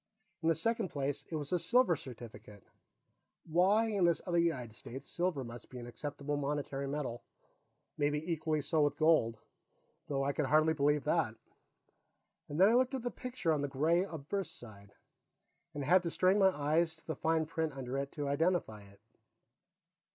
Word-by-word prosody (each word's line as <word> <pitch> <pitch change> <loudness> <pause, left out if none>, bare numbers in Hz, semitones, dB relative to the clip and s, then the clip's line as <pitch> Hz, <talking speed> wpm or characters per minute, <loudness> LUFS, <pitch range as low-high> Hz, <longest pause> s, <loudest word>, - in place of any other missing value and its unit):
In 165 - +2
the 165 - +3
second 225 +5 0
place, 140 -2 -3
it 165 - -4
was 150 +1 -3
a 180 - +3
silver 240 -3 +3
certificate; 115 -6 -11 0.8
why, 190 +7 +3
in 205 -4 0
this 170 -1 +3
other 175 -1 +1
United 130 -10 0
States, 135 +4 -9
silver 170 -6 -1
must 120 0 -9
be 130 - -9
an 120 - -7
acceptable 145 +4 -4
monetary 140 -1 -2
metal; 135 -4 -3 0.8
maybe 145 0 +2
equally 155 -1 0
so 155 +2 +1
with 145 -1 +1
gold, 155 -8 +3 0.7
though 135 -3 -1
I 140 +1 0
could 150 -2 -1
hardly 155 +3 +4
believe 145 -1 +2
that. 150 -7 +1 1.1
Then 165 +7 +5
I 220 - +4
looked 255 +2 +3
at 255 - -4
the 245 - -2
picture 250 -10 -2
on 150 - 0
the 145 - -1
gray 160 +6 +2
obverse 180 +2 -4
side, 100 -4 -12 0.8
and 145 - -3
had 180 +7 +5
to 170 - -2
strain 185 +4 +3
my 190 -1 +6
eyes 160 0 +1
on 160 - -21
the 160 - -3
fine 160 0 +1
print 160 -1 -2
under 130 -1 -5
it 140 0 -4
to 145 -2 -3
identify 145 - 0
it. 100 0 -18
150 Hz, 175 wpm, -33 LUFS, 140-170 Hz, 1.1 s, my